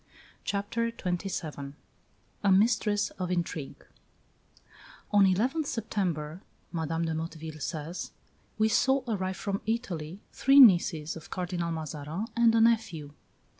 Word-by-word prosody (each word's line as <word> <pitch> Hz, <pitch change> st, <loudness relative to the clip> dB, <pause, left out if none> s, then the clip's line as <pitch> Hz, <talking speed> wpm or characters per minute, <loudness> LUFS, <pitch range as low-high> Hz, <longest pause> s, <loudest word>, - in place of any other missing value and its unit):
CHAPTER 225 Hz, +4 st, -1 dB
XXVII 175 Hz, -9 st, -4 dB, 0.7 s
A 200 Hz, -, +4 dB
MISTRESS 205 Hz, 0 st, +3 dB
OF 180 Hz, -1 st, -2 dB
INTRIGUE 170 Hz, -5 st, -3 dB, 1.3 s
"On 205 Hz, -1 st, +6 dB
11th 255 Hz, -, +1 dB
September," 180 Hz, -7 st, -2 dB, 0.3 s
Madame 165 Hz, 0 st, -1 dB
de 160 Hz, -, -1 dB
Motteville 160 Hz, -1 st, -6 dB
says, 160 Hz, +3 st, -4 dB, 0.5 s
"we 215 Hz, 0 st, +3 dB
saw 265 Hz, +4 st, +3 dB
arrive 190 Hz, -4 st, -2 dB
from 200 Hz, -2 st, -3 dB
Italy 190 Hz, -6 st, -3 dB
three 275 Hz, +1 st, +5 dB
nieces 175 Hz, -, +6 dB
of 160 Hz, -, -10 dB
Cardinal 175 Hz, -2 st, -3 dB
Mazarin 155 Hz, +3 st, -4 dB
and 235 Hz, -1 st, +4 dB
a 225 Hz, -, +4 dB
nephew. 195 Hz, -11 st, +1 dB
185 Hz, 115 wpm, -29 LUFS, 160-220 Hz, 1.3 s, On